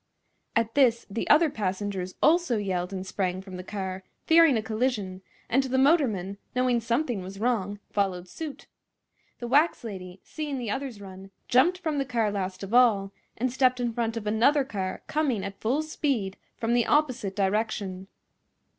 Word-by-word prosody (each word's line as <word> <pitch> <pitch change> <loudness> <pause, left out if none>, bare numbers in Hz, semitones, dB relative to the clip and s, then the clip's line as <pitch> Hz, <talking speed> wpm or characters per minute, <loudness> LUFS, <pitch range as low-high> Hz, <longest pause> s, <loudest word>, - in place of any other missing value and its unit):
At 230 0 +1
this 240 -5 +3
the 225 - -3
other 310 0 +6
passengers 190 -3 -3
also 330 -6 +4
yelled 185 -3 -2
and 190 -1 -5
sprang 185 -1 -2
from 190 -1 -9
the 180 - -6
car, 190 -1 -5 0.2
fearing 325 -5 +6
a 220 - -2
collision; 215 -5 -2 0.3
and 265 - +3
the 260 -1 -1
motorman, 235 - +2 0.2
knowing 250 -2 +2
something 235 -1 -1
was 190 +2 -8
wrong, 205 -4 0
followed 185 -3 -1
suit. 305 - -7 0.7
The 240 - -5
wax 290 +4 +3
lady, 190 -4 -7
seeing 300 -3 -4
the 235 -5 -3
others 265 -3 -4
run, 190 0 -10 0.2
jumped 305 +9 +4
from 315 -5 -2
the - - +2
car 230 -4 0
last 190 -1 -4
of 195 +3 -6
all, 215 -6 +4 0.3
and 245 +2 -1
stepped 255 -1 +3
in 240 -1 -1
front 230 -1 -1
of 220 - -5
another 235 +7 +3
car 190 -6 -4
coming 275 -10 0
at 195 0 -8
full 265 +8 +1
speed 265 -11 -1 0.2
from 230 +1 0
the 240 -2 +2
opposite 255 -10 +1
direction. 195 -2 -1
225 Hz, 170 wpm, -27 LUFS, 195-260 Hz, 0.7 s, other